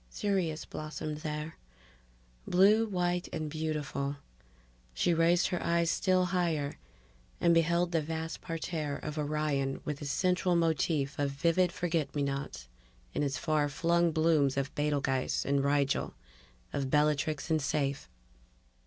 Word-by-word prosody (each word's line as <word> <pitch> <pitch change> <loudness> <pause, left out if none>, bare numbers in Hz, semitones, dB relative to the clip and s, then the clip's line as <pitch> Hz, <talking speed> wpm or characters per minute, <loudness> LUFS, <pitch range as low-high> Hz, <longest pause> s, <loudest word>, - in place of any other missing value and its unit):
Sirius 180 - -1
blossomed 155 0 -5
there, 150 +1 -5 0.9
blue 210 +5 +5
white 180 -2 -1
and 155 -1 -4
beautiful. 150 -3 -2 0.8
She 175 - +2
raised 170 +2 +3
her 180 -2 -2
eyes 170 0 +2
still 185 -2 +2
higher 160 -6 0 0.6
and 170 -1 +4
beheld 170 +1 +2
the 165 -2 +2
vast 160 +1 -4
parterre 160 -3 -3
of 150 +1 -5
Orion 145 -2 -1
with 150 -1 -4
its 145 - -4
central 180 +3 +1
motif 155 -3 +1
of 145 -1 +1
vivid 170 +5 +2
forget 165 -6 -2
me 145 - +1
nots, 140 - -4 0.5
its 140 -3 -1
far 150 -1 +1
flung 170 +2 +2
blooms 155 -4 +2
of 140 0 -1
Betelguese 140 -3 0
and 140 0 +1
Rigel, 140 -1 +1 0.6
of 135 -2 -1
Bellatrix 150 +1 +1
and 160 - +3
Saiph 140 0 -1
155 Hz, 130 wpm, -31 LUFS, 145-170 Hz, 0.9 s, blue